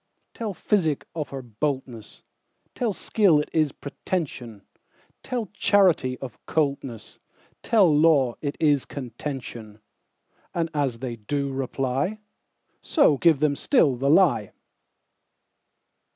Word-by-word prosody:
Tell 215 -4 -5
physic 160 -9 0
of 155 -3 -4
her 135 -1 -6
boldness; 125 -1 -5 0.5
Tell 235 -3 -1
skill 195 -5 +3
it 150 - -4
is 155 -3 +2
pretension; 130 - -5 0.6
Tell 245 -4 -3
charity 185 -11 +3
of 125 -4 -9
coldness; 140 -7 -2 0.4
Tell 195 -9 +4
law 145 -5 +4
it 145 -1 -3
is 145 -4 +3
contention:And 125 +4 -8
as 140 -5 -1
they 120 -3 -4
do 140 +5 -3
reply, 135 - -2 0.6
So 280 - +3
give 160 -5 +4
them 150 -2 +2
still 155 - +2
the 135 +3 0
lie. 150 - +3
145 Hz, 110 wpm, -25 LUFS, 130-165 Hz, 0.6 s, Tell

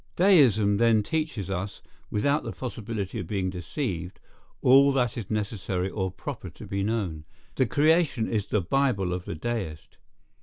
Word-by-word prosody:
Deism 125 - +5
then 115 -1 +4
teaches 155 - -2
us, 95 +2 -4 0.3
without 140 +8 +1
the - - -4
possibility 115 -4 -5
of 90 - -5
being 95 -2 -1
deceived, 90 - -4 0.4
all 135 +2 +7
that 125 -4 +1
is 115 -6 -6
necessary 100 -3 -2
or 95 -2 -1
proper 95 - -7
to - - -11
be 100 0 -2
known. 100 -7 -2 0.3
The 130 - +1
creation 150 -3 +3
is 105 -3 -1
the 105 - +1
Bible 100 -3 +1
of 90 0 -4
the - - -4
deist. 85 -5 -5
105 Hz, 155 wpm, -27 LUFS, 95-130 Hz, 0.4 s, all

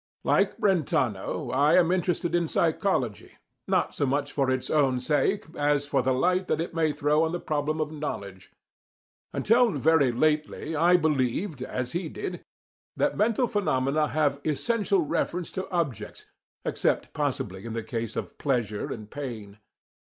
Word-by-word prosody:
Like - - +2
Brentano, 135 - 0
I 145 +3 +4
am 175 -1 +4
interested 175 -2 0
in 170 -1 +2
psychology, 155 - 0 0.3
not - - +1
so 145 - 0
much 140 +2 -1
for 135 -2 0
its 130 -1 -1
own 135 -5 +3
sake, 150 +9 +1
as 145 -1 +1
for 140 -2 +1
the 130 +1 +1
light 180 +8 +1
that - - 0
it 165 - -3
may 160 -2 +2
throw 150 +1 +2
on 160 +1 -1
the 175 - -2
problem 155 0 -1
of 155 -1 -1
knowledge. 100 -11 -6 0.8
Until 235 +2 +3
very 145 -2 +3
lately 155 +4 0
I 175 +4 +5
believed, 150 - 0
as 125 -1 -3
he 170 -1 -3
did, 175 +3 -6 0.5
that - - +1
mental 230 +3 +2
phenomena 150 - +1
have 145 -2 0
essential 200 - +1
reference 170 +3 -2
to 190 - -5
objects, 165 - -3 0.4
except - - 0
possibly 95 +1 -2
in 115 - -6
the 115 -1 -3
case 115 -2 -4
of - - -5
pleasure 120 -7 -1
and 110 -2 -6
pain. 110 -6 -7
150 Hz, 155 wpm, -27 LUFS, 130-170 Hz, 0.8 s, I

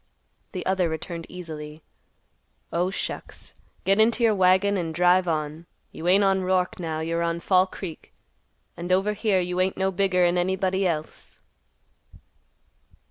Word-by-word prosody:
The 185 - -5
other 185 -2 +1
returned 165 +1 -5
easily, 155 -4 -8 0.9
"Oh, 175 +2 +1
shucks! 195 - -6 0.3
Get 195 +2 +3
into 230 +2 +3
your 225 -2 +5
wagon 190 +1 +3
and 165 -4 -3
drive 180 +1 +4
on. 155 0 -3 0.2
You 165 - -6
ain't 195 +3 +5
on 195 -1 +2
Roark 185 -1 0
now. 160 -2 -3
You're 165 +1 -1
on 170 0 -1
Fall 185 +2 +3
Creek, 180 -4 -9 0.6
and 175 +1 -5
over 195 +3 +2
here 210 -2 +1
you 180 0 -1
ain't 185 +1 0
no 190 0 +1
bigger'n 180 -2 +2
anybody 190 +1 0
else." 155 -2 -5
180 Hz, 140 wpm, -25 LUFS, 170-190 Hz, 0.9 s, your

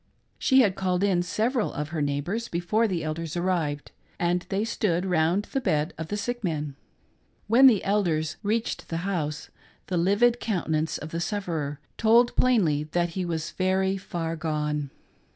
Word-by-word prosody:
She 265 -1 +5
had 205 -6 +3
called 185 -1 0
in 190 -3 +3
several 220 +6 0
of 150 +1 -4
her 160 -2 -3
neighbors 145 +11 -2
before 195 +7 +1
the 175 -5 -2
elders 160 +1 -4
arrived, 170 -5 -1 0.3
and 175 +1 0
they 200 +3 0
stood 190 -6 0
round 175 +2 +2
the 270 - -3
bed 155 -8 0
of 160 - -6
the 205 - -3
sick 240 +3 -3
man. 150 -5 -2 0.7
When 245 +5 +7
the 220 -7 +4
elders 170 -6 0
reached 220 +2 -2
the 165 +2 -3
house, 155 -6 -3 0.3
the 180 - -2
livid 205 +7 +3
countenance 160 -6 -1
of 155 - -7
the 165 - -3
sufferer 165 -7 -3 0.2
told 230 +2 +4
plainly 175 -13 +3
that 175 0 +1
he 185 +2 -3
was* 165 -2 -3
very 190 +1 +1
far 170 -4 -4
gone. 150 -3 -2
175 Hz, 165 wpm, -26 LUFS, 160-205 Hz, 0.7 s, When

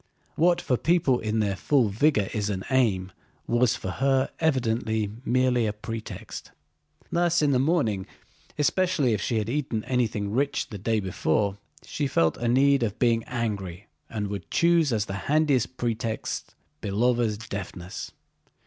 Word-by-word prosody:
What 175 +2 +3
for 125 - +1
people 155 -6 +2
in 110 0 0
their 100 -2 0
full 125 +3 +2
vigor 105 -1 +2
is 105 -1 -1
an 95 -2 -3
aim 100 -8 +2 0.3
was 120 0 +2
for 95 - -4
her 135 +3 +1
evidently 115 -8 0
merely 125 -2 +2
a 105 - -1
pretext. 110 +1 -7 0.6
Thus 175 -1 +2
in 145 - +3
the 130 - +3
morning—especially 145 - 0
if 105 - -1
she 115 - 0
had 105 -1 -1
eaten 120 -4 -2
anything 110 -5 -1
rich 140 +6 0
the 105 -5 -7
day 110 +3 +1
before—she 100 - -2
felt 80 -10 +2
a 120 - -2
need 135 +3 +4
of 110 -3 -1
being 115 -2 +2
angry 105 -8 -3 0.2
and 105 -2 -3
would 100 -1 -6
choose 170 -4 +3
as 105 -3 +1
the 95 - -5 0.2
handiest 145 -5 +2
pretext 115 -2 -3 0.3
Belóva's 115 +1 +1
deafness. 100 -4 -6
115 Hz, 145 wpm, -26 LUFS, 105-135 Hz, 0.6 s, need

